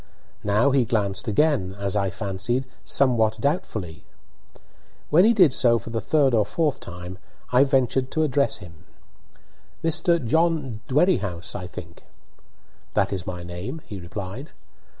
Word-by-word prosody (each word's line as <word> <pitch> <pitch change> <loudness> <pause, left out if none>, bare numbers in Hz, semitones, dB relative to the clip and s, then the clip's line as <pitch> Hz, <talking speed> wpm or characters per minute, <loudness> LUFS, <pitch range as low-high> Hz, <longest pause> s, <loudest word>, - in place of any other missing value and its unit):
Now 105 +7 +3
he 135 -2 +3
glanced 100 -4 0
again, 110 -6 +1
as 100 0 -2
I 100 -2 +1
fancied, 100 +6 -2 0.2
somewhat 115 -5 +2
doubtfully. 110 - -2 1.1
When 175 +6 +6
he 225 - +6
did 180 - +5
so 120 -3 +4
for 115 - -8
the 115 -1 -2
third 145 -5 +2
or 110 -2 +4
fourth 145 +6 -1
time 90 +1 -9 0.3
I 125 +2 +6
ventured 130 -1 +1
to 155 - +1
address 140 -4 +1
him. 85 -4 -14 1.0
"Mr. 165 +1 +2
John 150 -4 +1
Dwerrihouse, 130 - +1
I 90 - -5
think?" 85 -1 -11 0.9
"That - - +1
is 95 -3 -4
my 90 -1 -5
name," 90 - -6
he 100 -3 -8
replied. 95 - -7
115 Hz, 140 wpm, -24 LUFS, 95-140 Hz, 1.1 s, When